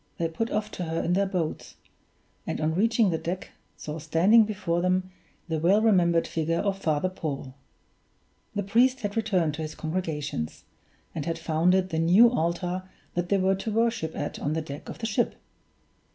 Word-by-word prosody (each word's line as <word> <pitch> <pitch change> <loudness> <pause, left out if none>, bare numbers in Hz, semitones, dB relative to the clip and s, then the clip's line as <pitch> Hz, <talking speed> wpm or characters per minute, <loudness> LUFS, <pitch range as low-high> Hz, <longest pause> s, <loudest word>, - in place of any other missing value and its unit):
They 165 - 0
put 225 +8 -2
off 210 0 -2
to 180 - -4
her 165 0 -2
in 175 - +1
their 195 +2 +2
boats; 175 -5 -3 0.7
and - - -2
on 155 +1 0
reaching 220 +2 +3
the 160 - -1
deck 180 +2 -4 0.3
saw 155 +1 -6
standing 175 +9 +5
before 185 -5 -1
them 185 +1 0 0.4
the 160 -2 -1
well 185 +6 +4
remembered 180 -6 +3
figure 165 +1 -1
of 195 0 -1
Father 155 -1 +1
Paul. 145 -7 -5 1.0
The 205 - 0
priest 245 +6 +3
had 205 -1 -3
returned 190 -8 +1
to 160 - -5
his 155 0 -5
congregations, 155 - -3 0.5
and 155 0 -4
had 165 0 -1
founded 175 +3 +2
the 160 - -1
new 190 +9 +6
altar 180 -1 -2 0.2
that 175 0 -2
they 200 - +3
were 190 0 +3
to 215 +3 -4
worship 225 -7 0
at 145 - -4
on 145 - -1
the 160 - -1
deck 145 +1 -8
of - - -7
the 225 - -4
ship! 225 +2 0
180 Hz, 180 wpm, -27 LUFS, 160-200 Hz, 1.0 s, new